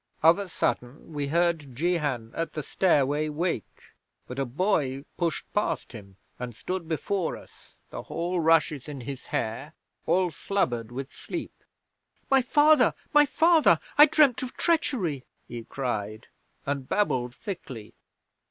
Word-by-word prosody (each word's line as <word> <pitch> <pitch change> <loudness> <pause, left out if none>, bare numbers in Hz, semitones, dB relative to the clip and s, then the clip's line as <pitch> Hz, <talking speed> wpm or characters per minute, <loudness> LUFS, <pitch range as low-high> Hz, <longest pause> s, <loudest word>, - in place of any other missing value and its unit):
'Of 165 +4 +6
a 200 -2 -5
sudden 140 0 -3
we 145 -1 -2
heard 165 -4 0
Jehan 145 -7 -1
at 165 - -3
the 150 - -4
stairway 150 -3 +2
wake, 150 - -4 0.3
but 125 +2 -7
a 135 - +1
boy 140 - 0
pushed 170 -3 -1
past 210 - -1
him, 100 -5 -12 0.2
and 120 -2 -6
stood 170 +10 -4
before 170 +2 -1
us, - - -18 0.2
the - - -5
hall 175 +2 -2
rushes 160 -4 +2
in 140 -3 -6
his 135 +1 -7
hair, 145 +2 -3 0.3
all 180 +1 +2
slubbered 120 - -1
with 135 +2 -6
sleep. - - -6 0.8
"My 270 -1 +6
father! 290 0 +4 0.2
My 295 0 +6
father! 325 +2 +4 0.2
I 295 +1 +9
dreamed 280 -5 +4
of 255 -1 -6
treachery," 215 - 0 0.2
he 115 -1 -7
cried, 110 -4 -4 0.4
and 140 -2 -3
babbled 125 -12 0
thickly. 145 - -7
155 Hz, 140 wpm, -27 LUFS, 130-185 Hz, 0.8 s, I